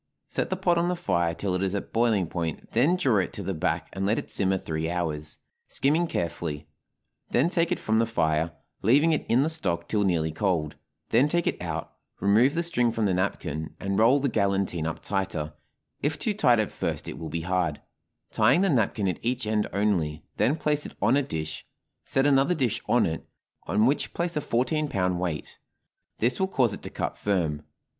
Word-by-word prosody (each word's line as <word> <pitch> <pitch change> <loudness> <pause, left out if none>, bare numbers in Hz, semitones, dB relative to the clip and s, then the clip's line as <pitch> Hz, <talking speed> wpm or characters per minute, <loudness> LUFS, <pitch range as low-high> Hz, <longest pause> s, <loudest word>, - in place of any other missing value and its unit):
Set - - -2
the 185 - 0
pot 175 -2 +2
on 170 - +1
the 180 - 0
fire 85 - 0
till 95 0 -2
it 90 - 0
is 95 0 0
at 100 - -5
boiling 115 -5 +3
point, 80 -2 -4
then 140 +10 +3
draw 135 - +2
it 95 - -1
to 100 - -6
the 95 - -2
back 80 -1 -1
and 95 - -3
let 105 +3 +2
it - - -5
simmer 95 -1 +1
three 80 -2 -3
hours, 80 -3 -3 0.3
skimming 155 +5 +1
carefully; 80 - -3 0.6
then 145 +8 +2
take 170 -1 +1
it 180 - +2
from 110 0 +1
the 115 - +2
fire, 80 -6 +1 0.3
leaving 145 +9 +4
it 155 - 0
in 125 +4 +4
the - - +1
stock 85 - -2
till 105 -2 +1
nearly 80 -4 +1
cold; 80 -3 -1 0.3
then 125 +6 +4
take 170 +2 0
it - - -1
out, 85 -2 -4 0.3
remove 115 +9 +4
the 170 - +1
string 125 -8 +1
from 115 -1 0
the 95 - +2
napkin, 80 -4 -2
and 100 +1 -1
roll 120 +6 +5
the 140 - +1
galantine 100 -7 0
up 80 - -5
tighter 95 -6 -2 0.5
if 145 +1 0
too 215 - -1
tight 125 - +4
at 110 -2 0
first - - -3
it - - -6
will 80 - -5
be 85 +2 -3
hard 90 -3 0 0.5
tying 125 +11 +4
the 195 -2 +3
napkin 110 -5 +1
at 90 - -1
each 125 0 -1
end 105 -1 +1
only; 85 -7 0
then 140 - +3
place 150 -2 0
it - - -8
on 130 - +3
a 145 - +4
dish, 80 - -4 0.4
set 135 0 +2
another 140 +4 +4
dish 130 -8 0
on - - +4
it, 80 0 -4 0.4
on 105 +6 +3
which 140 +4 0
place 170 -1 -1
a 150 - 0
fourteen 150 +5 0
pound 90 -7 0
weight; 85 -4 -4 0.6
this 120 +3 +1
will 190 - +2
cause 125 - +2
it - - -7
to - - -7
cut - - -4
firm. 85 -7 0
105 Hz, 210 wpm, -26 LUFS, 85-135 Hz, 0.6 s, roll